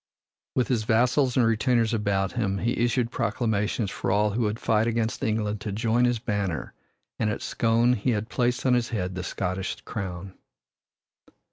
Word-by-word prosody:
With 125 - +2
his 120 -4 +1
vassals 125 +4 +2
and 125 - +5
retainers 115 0 +2
about 100 -3 0
him, 100 -5 -1
he 115 +4 0
issued 120 0 +1
proclamations 110 -2 -1
for - - -3
all 105 +2 +2
who 115 +4 -1
would 105 -1 0
fight 110 0 +2
against 115 -1 -1
England 105 -1 -1
to 105 - -4
join 115 +4 +2
his 120 -1 +2
banner, 100 -6 -3 0.5
and 110 - +1
at 105 - -3
Scone 115 +2 +2
he 115 +1 -1
had 110 -2 0
placed 125 0 0
on 130 - +4
his 120 -1 +1
head 95 -5 -2
the 90 - -4
Scottish 95 +1 -3
crown. 95 -3 -6
110 Hz, 170 wpm, -26 LUFS, 105-120 Hz, 0.5 s, and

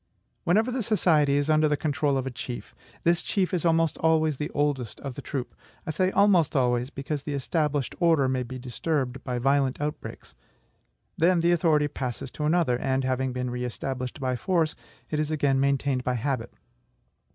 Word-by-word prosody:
Whenever 220 +8 +3
the 255 0 -1
society 160 -10 +3
is 145 0 +1
under 155 0 +4
the 150 -1 +1
control 145 -1 0
of 130 - -2
a 135 - -3
chief, 120 0 -7 0.3
this 170 0 +3
chief 190 -3 -1
is 175 - 0
almost 165 -1 +2
always 160 -2 +2
the 150 - -3
oldest 145 -5 -1
of 135 -2 -5
the 140 - -7
troop. 130 -2 -4 0.3
I - - -2
say 185 +5 +1
almost 190 -6 +3
always, 125 -1 +2
because 140 +1 -4
the 145 0 -4
established 145 0 -1
order 165 -6 +4
may 130 0 0
be 130 +1 -6
disturbed 130 +1 -2
by 125 -2 -2
violent 135 +1 +1
outbreaks. 150 +1 -5 0.9
Then 175 +1 +4
the 170 +1 +3
authority 160 -3 +3
passes 130 -3 -5
to 150 - -4
another; 155 -6 +2
and, 130 0 0
having 130 0 0
been 125 0 -3
re 125 0 -3
established 130 +2 -4
by 130 -2 -1
force, 165 +2 +1 0.4
it 155 - 0
is 155 -1 0
again 145 -3 +1
maintained 140 -1 +1
by 125 0 0
habit. 125 -1 -2
145 Hz, 185 wpm, -26 LUFS, 130-160 Hz, 0.9 s, under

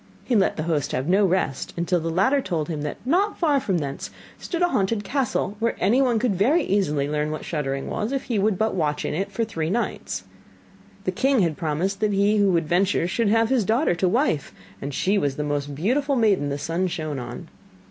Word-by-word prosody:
He 250 - +1
let 195 -3 +3
the 155 - -1
host 155 -4 -1
have 130 +3 -1
no 195 +3 +4
rest, 175 -7 -1
until 175 +1 +1
the 165 0 -3
latter 200 +12 +2
told 170 - -2
him, 155 -3 -3
that 150 0 -4
not 385 +9 +1
far 300 -5 +2
from 195 -8 0
thence 140 -3 -4 0.3
stood 350 -1 -2
a 350 - +3
haunted 205 - 0
castle 230 -3 -1
where 230 +1 0
anyone 245 +3 +3
could 220 -3 +1
very 275 - +3
easily 150 -8 +1
learn 150 0 -1
what 155 - -5
shuddering 135 -4 -3
was, 215 +3 -2
if 275 -1 -1
he 230 -5 -1
would 200 -1 +2
but 220 +2 +1
watch 150 -5 -1
in - - -2
it 195 +5 -2
for 230 +3 -1
three 165 -7 -3
nights. 235 +6 -2 0.8
The - - 0
king 270 -3 +2
had 165 -4 +1
promised 170 +5 -2
that 215 -1 +1
he 200 +2 +3
who 200 -1 +4
would 165 -3 +1
venture 180 +1 +2
should 215 +4 0
have 225 +1 +3
his 260 -4 +2
daughter 225 - +2
to 180 +1 +1
wife, 230 - 0 0.3
and 140 - -4
she 195 +8 +1
was 140 -4 -1
the 150 - -2
most 145 -1 -2
beautiful 270 - +1
maiden 205 - +2
the 140 - -2
sun 165 +5 -1
shone 155 -5 -3
on. 125 - -7
190 Hz, 220 wpm, -24 LUFS, 155-225 Hz, 0.8 s, no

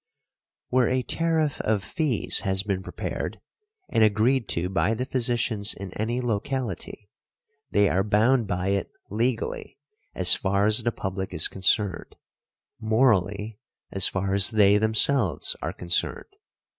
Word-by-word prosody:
Where 125 -2 +2
a 130 0 0
tariff 160 0 -1
of 105 -3 -1
fees 140 - 0
has 95 -1 +1
been 100 -2 -2
prepared, - - -6 0.5
and 110 - +2
agreed 110 +3 +1
to 85 +1 0
by 95 +4 0
the 125 - -3
physicians 120 -5 0
in 95 -1 -8
any 120 +4 -2
locality, 120 -2 -4 0.6
they 100 0 +3
are 95 +1 +1
bound 110 +3 +2
by 90 +1 -2
it 100 0 -1 0.2
legally 115 +2 -3 0.4
as 90 -1 +4
far 100 +1 +1
as 110 +2 +5
the 120 +1 -1
public 95 -2 -5
is 80 - +4
concerned, 95 0 0 0.6
morally 110 -2 0 0.3
as 95 -1 +4
far 95 0 -2
as 100 0 +5
they 105 -2 +4
themselves 110 - +2
are - - -3
concerned. 85 - -3
105 Hz, 135 wpm, -25 LUFS, 95-120 Hz, 0.6 s, as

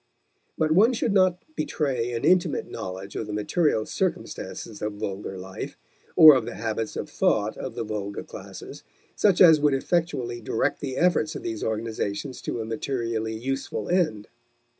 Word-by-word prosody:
But 155 0 +1
one 215 +10 +5
should 225 -2 0
not 185 -2 +3
betray 130 - -1
an 115 +4 -2
intimate 175 -1 +3
knowledge 95 +2 -6
of 110 - -3
the 105 - -5
material 110 +2 +1
circumstances 105 -3 -4
of 105 0 -2
vulgar 100 -2 -5
life, 95 +1 -7 0.4
or 155 -1 +11
of 130 -4 +1
the 120 - -6
habits 110 0 -3
of - - -4
thought 105 +1 +1
of 130 -3 -6
the - - -2
vulgar 105 -2 -4
classes, - - -10 0.3
such 200 -4 +3
as 160 -4 +8
would 145 -2 +3
effectually 135 -6 -1
direct - - 0
the 130 -2 -4
efforts 165 -3 +2
of - - -6
these 110 -2 -4
organizations 110 +2 -3
to 115 - -3
a - - -4
materially 115 -1 -2
useful 135 +4 -3
end. 155 - +1
120 Hz, 160 wpm, -25 LUFS, 110-155 Hz, 0.4 s, or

